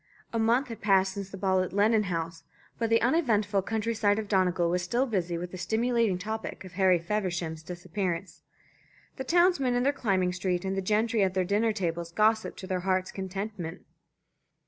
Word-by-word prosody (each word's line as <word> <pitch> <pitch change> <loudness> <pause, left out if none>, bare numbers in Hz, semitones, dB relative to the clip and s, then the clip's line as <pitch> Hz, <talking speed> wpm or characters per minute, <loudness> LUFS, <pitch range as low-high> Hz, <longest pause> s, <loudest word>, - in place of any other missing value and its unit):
A 230 - 0
month 235 +4 +2
had 230 - -7
passed 190 -2 +3
since 195 -1 -6
the 195 - -8
ball 190 -1 +2
at 185 - -4
Lennon 210 +1 +3
House, 165 -2 -4 0.4
but 230 -1 0
the 230 0 +3
uneventful 220 - +2
country 225 +3 -2
side 210 -2 +2
of 220 -1 -3
Donegal 185 -3 +2
was 180 0 +1
still 235 +9 0
busy 180 -8 -1
with 175 +1 -5
the 185 - -7
stimulating 225 +1 +1
topic 220 +1 -5
of 185 - -10
Harry 185 -1 +4
Feversham's 170 -3 -2
disappearance. 180 +1 -4 0.8
The 265 - -3
townsmen 335 -4 +3
in 245 - +1
the 280 +2 +2
climbing 190 -8 0
street 185 -1 -1
and 190 0 -1
the 195 - -1
gentry 215 +3 +1
at 190 -1 +1
their 185 -1 +1
dinner 210 +4 +2
tables 170 -4 -3
gossiped 220 +3 +2
to - - -6
their 185 -1 -1
hearts' 185 0 0
contentment. 190 -2 -5
195 Hz, 190 wpm, -28 LUFS, 180-220 Hz, 0.8 s, Harry